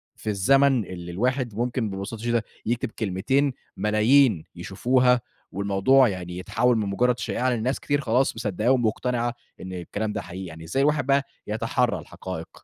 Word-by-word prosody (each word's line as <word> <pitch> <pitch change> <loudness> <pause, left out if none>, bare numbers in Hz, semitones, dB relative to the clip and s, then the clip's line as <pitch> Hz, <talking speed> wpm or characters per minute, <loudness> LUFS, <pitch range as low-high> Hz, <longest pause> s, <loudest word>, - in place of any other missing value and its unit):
في 110 - -6
الزمن 130 +4 +3
اللي 90 -1 -7
الواحد 125 +4 -1
ممكن 120 -1 -1
ببساطة 100 +3 -6
شديدة 120 -1 0 0.2
يكتب 120 +1 -1
كلمتين، 120 +8 0 0.2
ملايين 110 - +4
يشوفوها، 125 -1 +2 0.3
والموضوع 100 +7 +3
يعني 90 -3 -5
يتحول 125 +6 +1
من 105 -2 -1
مجرد 125 +5 +1
شائعة، 130 +1 -1
لأن 120 - 0
الناس 130 +4 -1
كتير 145 0 0
خلاص 125 +3 +1
مصدّقاه 115 +2 0
ومقتنعة 120 0 0 0.3
إن 95 0 -7
الكلام 105 +4 -4
ده - - -3
حقيقي؟ 95 +1 -7
يعني 80 -1 -9
إزاي 135 +12 0
الواحد 145 -1 +2
بقى 140 0 +3 0.2
يتحرّى - - 0
الحقائق؟ 90 -3 -7
115 Hz, 155 wpm, -25 LUFS, 95-130 Hz, 0.3 s, ملايين